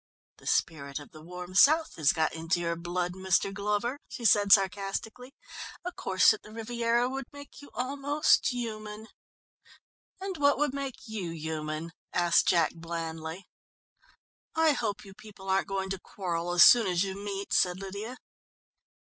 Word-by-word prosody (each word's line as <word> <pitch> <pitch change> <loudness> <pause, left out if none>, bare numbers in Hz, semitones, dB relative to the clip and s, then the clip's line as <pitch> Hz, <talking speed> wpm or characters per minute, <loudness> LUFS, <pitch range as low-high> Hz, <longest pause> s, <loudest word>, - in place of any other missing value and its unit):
"The - - -13
spirit 140 -3 0
of 145 - -9
the 155 - -13
warm 180 +2 -9
south 315 - +5
has 150 -3 +4
got 160 -1 0
into 165 +2 -1
your 170 -1 -1
blood, 175 +1 -3
Mr. 190 +1 +1
Glover," 210 +6 -1
she 240 - -7
said 205 -2 +4
sarcastically. 200 +6 +1 0.5
"A 360 - -2
course 190 - +4
at 215 - -8
the 210 - -14
Riviera 235 +2 0
would 270 +1 -4
make 285 +1 -12
you 285 - -13
almost 280 +4 +2
human." 220 -3 -5 1.1
"And 380 -2 -5
what 285 -1 +3
would 295 -2 0
make 275 -2 -4
you 210 -6 -4
human?" 160 0 -4 0.2
asked 175 -1 +3
Jack 170 -3 +3
blandly. 165 +1 -6 1.1
"I 320 -1 +4
hope 210 -7 -2
you 195 - -12
people 195 -1 -13
aren't 190 +1 +1
going 190 -1 -3
to 195 - -3
quarrel 175 -3 -4
as 175 -2 +7
soon 235 +2 +7
as 180 0 +1
you 195 -1 -3
meet," 200 0 -5
said 180 0 +3
Lydia. 200 +6 -6
195 Hz, 155 wpm, -29 LUFS, 175-235 Hz, 1.1 s, as